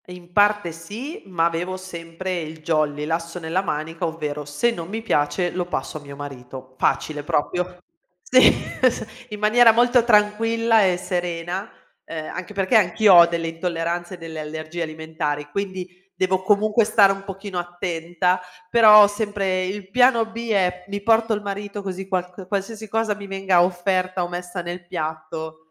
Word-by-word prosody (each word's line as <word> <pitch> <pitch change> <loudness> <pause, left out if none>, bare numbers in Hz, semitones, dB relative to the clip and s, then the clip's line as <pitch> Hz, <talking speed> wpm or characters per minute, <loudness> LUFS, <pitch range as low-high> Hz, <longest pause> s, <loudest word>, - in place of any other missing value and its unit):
In 180 -1 -12
parte 205 -3 +3
sì, 210 - -8
ma 170 -3 +1
avevo 175 +2 -2
sempre 180 0 -5
il 160 0 -8
jolly, 150 -2 0
l'asso 165 +2 -3
nella 170 +2 -1
manica, 165 0 -3
ovvero 150 -2 -4
se 145 +12 0
non 170 -7 -6
mi 220 +4 -5
piace 175 -1 0
lo 180 -1 -2
passo 155 -3 -4
a - - -16
mio 140 -1 -10
marito. 130 -2 -9
Facile 150 +2 0
proprio. 180 +5 -1 0.5
Sì 255 0 +6 0.3
s 255 -3 +2 0.2
in 210 -1 -7
maniera 225 +3 +6
molto 240 +1 +4
tranquilla 225 0 +3
e 180 -1 +2
serena, 175 +1 -3 0.4
ehm, 155 -1 -6
anche 185 +3 -6
perché 195 +3 0
anch'io 205 +1 +4
ho 170 -1 +10
delle 170 -1 -2
intolleranze 170 +1 -3
e - - -14
delle 165 -2 -8
allergie 155 +2 -6
alimentari, 155 -2 -3
quindi 190 0 -3 0.3
devo 185 0 +1
comunque 210 +3 +3
stare 210 -2 +5
un 195 0 -9
pochino 195 -1 -6
attenta. 175 +1 -1 0.3
Però 215 -3 +9
sempre 200 -3 -1
il 195 0 -6
piano 245 -1 +4
B 230 +1 -7
è: 180 -3 +1
mi 200 0 -4
porto 225 +1 +3
il 210 - -2
marito 205 0 -5
così 190 0 -5
qualc 180 0 -4
qualsiasi 210 +3 -4
cosa 225 0 0
mi 200 -1 -9
venga 195 -2 +2
offerta 185 0 0
o - - -2
messa 175 0 -5
nel 175 0 -7
piatto 160 0 -5
180 Hz, 165 wpm, -22 LUFS, 165-205 Hz, 0.5 s, ho